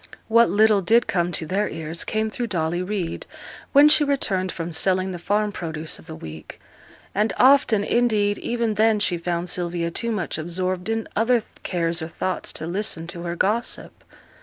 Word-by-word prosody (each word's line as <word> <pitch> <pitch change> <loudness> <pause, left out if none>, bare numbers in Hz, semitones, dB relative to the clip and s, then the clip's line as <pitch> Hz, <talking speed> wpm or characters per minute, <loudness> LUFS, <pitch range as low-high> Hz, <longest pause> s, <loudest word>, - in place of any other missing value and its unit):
What 230 +1 +5
little 215 -1 +4
did 230 +6 +4
come 175 -1 0
to 160 - -2
their 195 +6 0
ears 160 +1 -4
came 220 0 -1
through 240 +2 -3
Dolly 175 -3 -1
Reid, 185 -3 -3 0.4
when 285 +1 +7
she 300 0 +6
returned 200 -10 0
from 170 0 -5
selling 185 +3 +1
the 175 - -6
farm 210 +4 0
produce 160 -4 -3
of - - -16
the 160 - -7
week; 80 - -10 0.5
and 210 +2 +1
often, 255 -6 +5
indeed, 210 -4 +1
even 235 -2 -1
then 215 +1 +3
she 180 -4 0
found 170 +1 -2
Sylvia 175 -1 -2
too 235 +6 -2
much 185 -7 -2
absorbed 180 +4 -3
in 225 0 -1
other 230 +1 +2 0.2
cares 170 -2 -1
or 160 - -3
thoughts 185 +2 -3
to 155 - -6
listen 175 -1 -3
to 170 - -7
her 170 0 -3
gossip. 215 +7 -1
190 Hz, 180 wpm, -23 LUFS, 170-220 Hz, 0.5 s, when